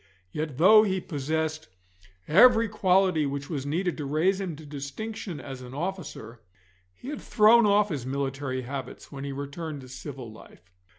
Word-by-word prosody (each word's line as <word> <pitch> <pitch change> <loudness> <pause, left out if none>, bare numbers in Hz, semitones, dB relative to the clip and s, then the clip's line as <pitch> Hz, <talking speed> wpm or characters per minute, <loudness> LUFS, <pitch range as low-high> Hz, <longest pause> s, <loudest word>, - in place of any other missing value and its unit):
Yet 150 0 -4
though 210 +7 +8
he 190 -3 0
possessed 155 -1 -3 0.6
every 230 +7 +6
quality 185 -6 +2
which 140 +2 -5
was 140 -3 -3
needed 175 +4 -1
to 150 - -4
raise 170 +7 +1
him 180 -5 -4
to 155 +1 -12
distinction 150 +6 -6
as 135 -2 -8
an 125 +1 -9
officer, 160 -8 -5 0.5
he 260 - -9
had 300 - -5
thrown 220 0 +5
off 205 +1 +3
his 145 -8 -3
military 135 0 -3
habits 130 0 -7
when 140 -1 -6
he 140 - -4
returned 145 +2 -6
to 130 - -12
civil 130 -2 -8
life. 95 -4 -16
155 Hz, 165 wpm, -27 LUFS, 135-190 Hz, 0.6 s, though